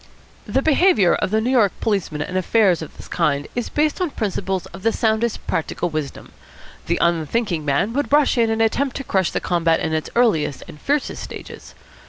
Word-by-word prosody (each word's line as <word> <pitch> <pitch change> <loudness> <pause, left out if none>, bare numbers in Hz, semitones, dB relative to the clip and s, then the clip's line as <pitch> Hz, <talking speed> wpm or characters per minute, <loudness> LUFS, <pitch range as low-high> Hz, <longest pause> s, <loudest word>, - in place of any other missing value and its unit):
The 270 - 0
behaviour 310 - +4
of - - 0
the 215 +2 +2
New 240 +4 0
York 225 -7 +3
policeman 185 -9 -1
in 180 - -7
affairs 185 -1 +3
of 160 - -9
this - - -11
kind 145 -4 0
is 245 -1 -2
based 305 +4 0
on 360 - +1
principles 195 -6 -2
of 190 - -9
the 225 - +2
soundest 220 0 0
practical 165 +2 -2
wisdom. 155 -3 -5 0.6
The - - +1
unthinking 170 +2 0
man 145 +10 +1
would 285 +2 -1
rush 295 0 +4
in 230 -2 +2
and 225 0 +1
attempt 260 +4 0
to 275 - -4
crush 190 -7 +1
the - - -2
combat 170 -2 +1
in 160 - -2
its 155 0 -2
earliest 210 - +2
and 150 - -12
fiercest 290 0 -1
stages. - - -10
205 Hz, 195 wpm, -21 LUFS, 165-240 Hz, 0.6 s, behaviour